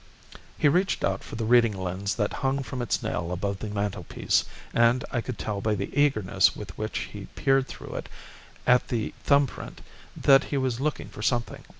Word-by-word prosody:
He -, -, +3 dB
reached 180 Hz, +7 st, +2 dB
out 95 Hz, 0 st, 0 dB
for -, -, -8 dB
the 115 Hz, 0 st, -2 dB
reading 115 Hz, -3 st, +4 dB
lens 95 Hz, +2 st, -2 dB
that 105 Hz, -, -1 dB
hung 135 Hz, 0 st, +1 dB
from 125 Hz, +1 st, -5 dB
its 120 Hz, -, -1 dB
nail 85 Hz, 0 st, -2 dB
above 100 Hz, +2 st, -2 dB
the 110 Hz, -, -4 dB
mantelpiece, 105 Hz, -1 st, 0 dB, 0.3 s
and 120 Hz, +1 st, +4 dB
I 120 Hz, -, 0 dB
could 125 Hz, -1 st, -5 dB
tell 105 Hz, -2 st, -3 dB
by 110 Hz, 0 st, +1 dB
the 100 Hz, 0 st, -4 dB
eagerness 140 Hz, -10 st, +3 dB
with -, -, -8 dB
which -, -, -3 dB
he -, -, -7 dB
peered 135 Hz, 0 st, +2 dB
through -, -, -9 dB
it -, -, -6 dB, 0.6 s
at 125 Hz, 0 st, +4 dB
the 115 Hz, -3 st, -2 dB
thumb 140 Hz, 0 st, +5 dB
print -, -, -9 dB, 0.4 s
that 135 Hz, 0 st, +6 dB
he 145 Hz, -, -2 dB
was 130 Hz, -2 st, -1 dB
looking 150 Hz, -1 st, -2 dB
for -, -, -9 dB
something. 120 Hz, +2 st, -1 dB
115 Hz, 195 wpm, -27 LUFS, 100-135 Hz, 0.6 s, that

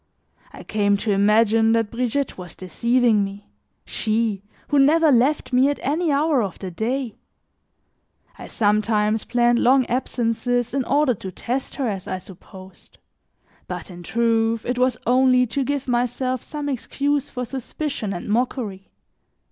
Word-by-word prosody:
I -, -, -11 dB
came 205 Hz, -1 st, +1 dB
to 210 Hz, +1 st, -2 dB
imagine 220 Hz, +2 st, +3 dB
that 225 Hz, -2 st, 0 dB
Brigitte 250 Hz, +3 st, -1 dB
was 180 Hz, -2 st, -9 dB
deceiving 230 Hz, +4 st, +1 dB
me, 200 Hz, +1 st, -7 dB, 0.4 s
she, 220 Hz, -2 st, -1 dB, 0.3 s
who 290 Hz, -, +3 dB
never 310 Hz, +3 st, +5 dB
left 265 Hz, +3 st, +2 dB
me 260 Hz, +3 st, +4 dB
at 290 Hz, -, -1 dB
any 310 Hz, +4 st, 0 dB
hour 285 Hz, -1 st, +2 dB
of 195 Hz, -5 st, -4 dB
the 190 Hz, -2 st, -6 dB
day; 235 Hz, +5 st, -3 dB, 1.2 s
I -, -, -8 dB
sometimes 215 Hz, 0 st, +1 dB
planned 240 Hz, 0 st, +2 dB
long 260 Hz, +1 st, +4 dB
absences 245 Hz, 0 st, -1 dB
in 270 Hz, -1 st, 0 dB
order 285 Hz, -1 st, +2 dB
to 190 Hz, -3 st, -8 dB
test 250 Hz, +8 st, -4 dB
her, 270 Hz, -3 st, -1 dB
as 195 Hz, -4 st, -4 dB
I 185 Hz, -, -2 dB
supposed; 185 Hz, 0 st, -14 dB, 0.7 s
but -, -, -6 dB
in 175 Hz, 0 st, -10 dB
truth, 230 Hz, +2 st, 0 dB
it 245 Hz, 0 st, -2 dB
was 250 Hz, -1 st, +2 dB
only 255 Hz, +1 st, +4 dB
to 270 Hz, +4 st, -2 dB
give 280 Hz, 0 st, -2 dB
myself 250 Hz, +1 st, -1 dB
some 295 Hz, -1 st, -6 dB
excuse 285 Hz, +2 st, -1 dB
for 250 Hz, -1 st, -4 dB
suspicion 265 Hz, -2 st, -4 dB
and 175 Hz, -2 st, -5 dB
mockery. 215 Hz, -3 st, -2 dB
240 Hz, 150 wpm, -22 LUFS, 210-265 Hz, 1.2 s, never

